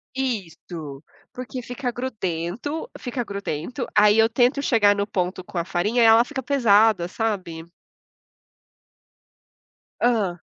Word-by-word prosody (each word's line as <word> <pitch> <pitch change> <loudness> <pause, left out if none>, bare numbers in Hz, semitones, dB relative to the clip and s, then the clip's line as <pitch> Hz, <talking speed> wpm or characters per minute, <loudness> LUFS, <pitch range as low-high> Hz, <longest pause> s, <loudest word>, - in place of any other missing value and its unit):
Isso. 170 - -5 0.3
Porque 255 0 -6
fica 245 +1 -4
grudento 235 - -4
fica 245 -1 -4
grudento. 200 - -5
Aí 210 +1 +5
eu 225 - +5
tento 250 +4 +2
chegar 210 -7 +3
no 200 - -1
ponto 185 -1 -2
com 180 - -9
a 170 - +1
farinha 210 +8 0
e - - +6
ela 225 +1 +7
fica 275 0 -5
pesada, 220 -8 +3
sabe? 180 -6 -4 2.3
Hã. 210 -8 +1
220 Hz, 120 wpm, -23 LUFS, 180-245 Hz, 2.3 s, ela